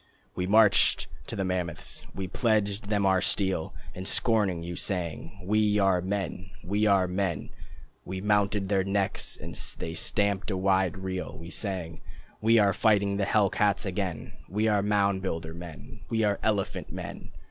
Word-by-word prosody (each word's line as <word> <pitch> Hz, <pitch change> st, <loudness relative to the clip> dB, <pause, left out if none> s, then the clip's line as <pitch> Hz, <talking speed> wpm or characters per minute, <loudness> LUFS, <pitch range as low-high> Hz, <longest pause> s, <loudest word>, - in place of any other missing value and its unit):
We 90 Hz, -, -2 dB
marched 105 Hz, 0 st, +5 dB, 0.2 s
to -, -, -4 dB
the 95 Hz, -, -1 dB
mammoths, 90 Hz, -3 st, -3 dB
We 95 Hz, -1 st, -3 dB
pledged 105 Hz, 0 st, 0 dB
them 100 Hz, -2 st, +1 dB
our 95 Hz, -1 st, +3 dB
steel, 95 Hz, -5 st, 0 dB, 0.2 s
And 95 Hz, +1 st, -7 dB
scorning 105 Hz, -7 st, +2 dB
you, 85 Hz, +1 st, -5 dB
sang: 90 Hz, +1 st, -3 dB
"We 105 Hz, +1 st, +2 dB
are 95 Hz, -3 st, +3 dB
men, 95 Hz, 0 st, -3 dB
We 105 Hz, +4 st, +1 dB
are 95 Hz, -2 st, +4 dB
men." 90 Hz, -5 st, -2 dB, 0.5 s
We 95 Hz, +1 st, -5 dB
mounted 105 Hz, 0 st, +1 dB
their 95 Hz, -1 st, +2 dB
necks, 100 Hz, 0 st, -1 dB
And -, -, -8 dB, 0.2 s
they 80 Hz, -, -4 dB
stamped 100 Hz, 0 st, 0 dB
a 95 Hz, -, -1 dB
wide 95 Hz, -2 st, +2 dB
reel. 95 Hz, -1 st, -4 dB
We 85 Hz, +1 st, -9 dB
sang: 90 Hz, -6 st, -4 dB, 0.4 s
"We 115 Hz, +1 st, +5 dB
are 100 Hz, -2 st, +4 dB
fighting 100 Hz, -1 st, +2 dB
the 100 Hz, -, +1 dB
hell 100 Hz, -1 st, +3 dB
cats 100 Hz, -1 st, +1 dB
again, 95 Hz, -4 st, -3 dB, 0.2 s
We 105 Hz, +5 st, 0 dB
are 105 Hz, -2 st, +3 dB
mound 100 Hz, -1 st, +1 dB
builder 80 Hz, -3 st, -3 dB
men, 85 Hz, -5 st, -10 dB
We 110 Hz, -1 st, +1 dB
are 100 Hz, -2 st, +1 dB
elephant 105 Hz, -3 st, -1 dB
men." -, -, -7 dB
100 Hz, 165 wpm, -28 LUFS, 90-105 Hz, 0.5 s, marched